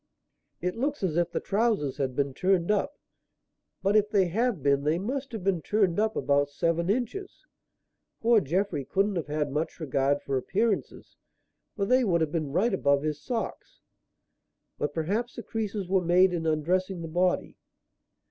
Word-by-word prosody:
"It 180 +1 -1
looks 275 +1 -2
as 170 -5 0
if 175 0 +2
the - - -2
trousers 200 - 0
had 130 -3 -2
been 140 -1 0
turned 185 +3 +1
up. 210 +8 0 0.9
But 200 +2 +2
if 210 -1 +4
they 195 -4 +2
have 220 - 0
been 140 0 +3
they 155 +3 +2
must 260 +8 -3
have 220 -5 -5
been 190 -3 +1
turned 200 -1 +1
up 220 0 +1
about 145 0 +2
seven 170 +4 0
inches. 255 - -3 0.7
Poor 230 -1 +4
Jeffrey 175 -1 -1
couldn't 195 +7 0
have 165 -4 -2
had 150 -1 -1
much 155 +5 -3
regard 140 -2 0
for 135 -1 -1
appearances, 205 - -2 0.6
for 200 - 0
they 255 +4 +3
would 175 -7 +2
have 155 -2 0
been 155 -4 -2
right 195 +9 +1
above 140 -6 +2
his 150 -1 -2
socks. 230 +6 -5 1.0
But - - -1
perhaps 205 +10 -1
the 235 - -6
creases 210 -3 -3
were 190 0 +2
made 180 +2 +4
in 165 -2 -2
undressing 175 +4 0
the - - -4
body." 180 +3 0
180 Hz, 170 wpm, -27 LUFS, 155-210 Hz, 1.0 s, if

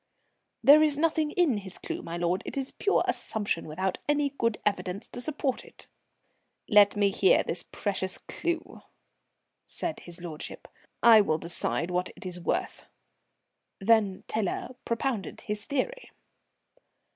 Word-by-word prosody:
"There 290 +5 +9
is 300 -2 +3
nothing 315 -1 +1
in 305 - +2
his 190 -2 -7
clue, - - -5
my 170 +1 -5
lord. 175 +2 0
It - - -6
is 270 -1 -3
pure 405 - +1
assumption, 205 -7 -2
without 185 +5 -2
any 290 -1 +2
good 230 -5 0
evidence 200 -1 -1
to 245 - -6
support 280 -2 -2
it." - - -14 0.8
"Let 205 -1 +6
me 200 -1 +3
hear 190 0 +4
this 170 - 0
precious 190 -2 -2
clue," 340 -1 -4 0.8
said 330 - -4
his 175 0 -9
lordship. 165 -3 -7 0.4
"I 225 -2 +9
will 155 -6 +1
decide 170 +1 -1
what 180 +1 0
it - - -11
is 180 -1 -5
worth." 170 - -2 0.9
Then 205 -2 +2
Tiler 215 0 -2 0.2
propounded 230 -3 -2
his 210 0 -4
theory. - - -2
210 Hz, 140 wpm, -28 LUFS, 185-280 Hz, 0.9 s, There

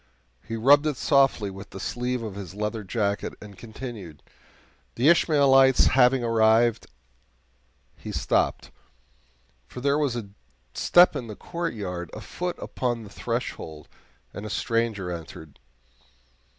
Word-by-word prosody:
He 115 - -4
rubbed 145 +6 +5
it 150 -4 -2
softly 135 -9 +2
with 95 +1 -10
the 95 - -9
sleeve 125 +3 -3
of 110 -3 -5
his 95 -2 -8
leather 105 +1 -3
jacket, 100 0 -2
and 105 -1 -12
continued: 110 - -9 0.7
"'The 130 +6 +3
Ishmaelites 135 -6 +5
having 130 -1 +4
arrived 115 0 +3 0.6
'" 60 0 -40
He - - -5
stopped, - - -1 1.0
for 125 - -9
there 140 +3 +1
was 140 -5 0
a 110 -4 -5 0.4
step 175 -2 +5
in 125 -4 -4
the 105 - -7
courtyard, 100 - -5
a - - -8
foot 180 0 -5
upon 120 -3 -3
the 100 - -12
threshold, 80 -1 -5 0.5
and 100 - -7
a 110 - -6
stranger 110 -4 -1
entered. 80 -3 -9
115 Hz, 135 wpm, -25 LUFS, 100-130 Hz, 1.0 s, rubbed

